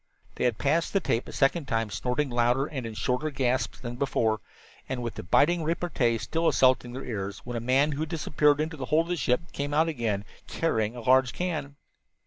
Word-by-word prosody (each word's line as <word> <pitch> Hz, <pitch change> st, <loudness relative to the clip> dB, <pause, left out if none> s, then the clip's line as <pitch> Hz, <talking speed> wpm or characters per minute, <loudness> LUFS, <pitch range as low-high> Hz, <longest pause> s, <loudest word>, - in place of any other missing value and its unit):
They -, -, -2 dB
had 120 Hz, -4 st, +1 dB
passed 160 Hz, +4 st, +1 dB
the 195 Hz, -, +4 dB
tape 120 Hz, -9 st, -1 dB
a -, -, -7 dB
second 140 Hz, +2 st, +1 dB
time, 115 Hz, -3 st, -1 dB
snorting 130 Hz, +5 st, -1 dB
louder 120 Hz, +3 st, +2 dB
and 130 Hz, -6 st, -5 dB
in 110 Hz, -, -7 dB
shorter 125 Hz, +7 st, -1 dB
gasps 130 Hz, -3 st, -1 dB
than 120 Hz, -1 st, -6 dB
before, 115 Hz, -5 st, +1 dB, 0.5 s
and 130 Hz, -2 st, -3 dB
with 115 Hz, -, -3 dB
the -, -, -6 dB
biting 165 Hz, -, +3 dB
repartee 155 Hz, -8 st, 0 dB
still 165 Hz, +8 st, -1 dB
assailing 130 Hz, -3 st, +3 dB
their 130 Hz, -, -6 dB
ears, 100 Hz, -4 st, -4 dB
when 120 Hz, -, -5 dB
the 120 Hz, -, -2 dB
man 130 Hz, +5 st, +2 dB
who 140 Hz, -, -4 dB
had 155 Hz, -1 st, -2 dB
disappeared 150 Hz, -2 st, +2 dB
into 155 Hz, +1 st, -2 dB
the 135 Hz, -, -4 dB
hold 155 Hz, +7 st, +2 dB
of -, -, -11 dB
the 175 Hz, -, +1 dB
ship 135 Hz, +2 st, 0 dB
came 145 Hz, +1 st, -3 dB
into 155 Hz, -, +5 dB
sight 165 Hz, -, +1 dB
again, 110 Hz, -9 st, -2 dB, 0.2 s
carrying 110 Hz, -8 st, 0 dB
a 120 Hz, -, -6 dB
large 130 Hz, +2 st, +4 dB
can. 155 Hz, -6 st, -3 dB
130 Hz, 220 wpm, -27 LUFS, 120-155 Hz, 0.5 s, into